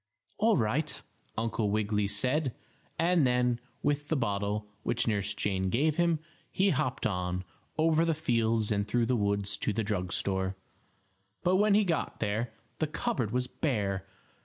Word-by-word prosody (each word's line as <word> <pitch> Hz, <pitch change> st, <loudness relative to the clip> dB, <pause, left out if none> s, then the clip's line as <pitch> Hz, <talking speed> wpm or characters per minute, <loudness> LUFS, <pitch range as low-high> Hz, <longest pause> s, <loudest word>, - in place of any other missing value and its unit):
"All 220 Hz, -2 st, +4 dB
right," 140 Hz, +8 st, 0 dB, 0.4 s
Uncle 115 Hz, -1 st, 0 dB
Wiggily 105 Hz, 0 st, +1 dB
said, 130 Hz, +7 st, +1 dB, 0.4 s
and 170 Hz, -3 st, +4 dB
then, 125 Hz, -1 st, +2 dB, 0.2 s
with 145 Hz, 0 st, 0 dB
the 160 Hz, -, +1 dB
bottle, 105 Hz, -3 st, -1 dB, 0.2 s
which 120 Hz, -, 0 dB
Nurse 105 Hz, -1 st, +1 dB
Jane 95 Hz, -2 st, 0 dB
gave 150 Hz, +8 st, +2 dB
him, 170 Hz, -2 st, +3 dB, 0.3 s
he 195 Hz, +1 st, +3 dB
hopped 135 Hz, -3 st, -1 dB
on, 90 Hz, -2 st, -1 dB, 0.3 s
over 160 Hz, 0 st, +4 dB
the 165 Hz, -1 st, +2 dB
fields 115 Hz, -7 st, +1 dB
and 100 Hz, -1 st, +1 dB
through 120 Hz, +2 st, +2 dB
the 125 Hz, -, +1 dB
woods 100 Hz, -1 st, 0 dB
to -, -, -1 dB
the 110 Hz, +2 st, -1 dB
drug 90 Hz, -4 st, -1 dB
store. 95 Hz, 0 st, 0 dB, 0.9 s
But 185 Hz, +1 st, +4 dB
when 205 Hz, 0 st, +4 dB
he 210 Hz, -, +5 dB
got 170 Hz, -5 st, -1 dB
there 110 Hz, +2 st, -1 dB, 0.3 s
the 155 Hz, -, +1 dB
cupboard 130 Hz, -7 st, -1 dB
was 125 Hz, +3 st, 0 dB
bare 100 Hz, -, -1 dB
115 Hz, 160 wpm, -30 LUFS, 100-150 Hz, 0.9 s, he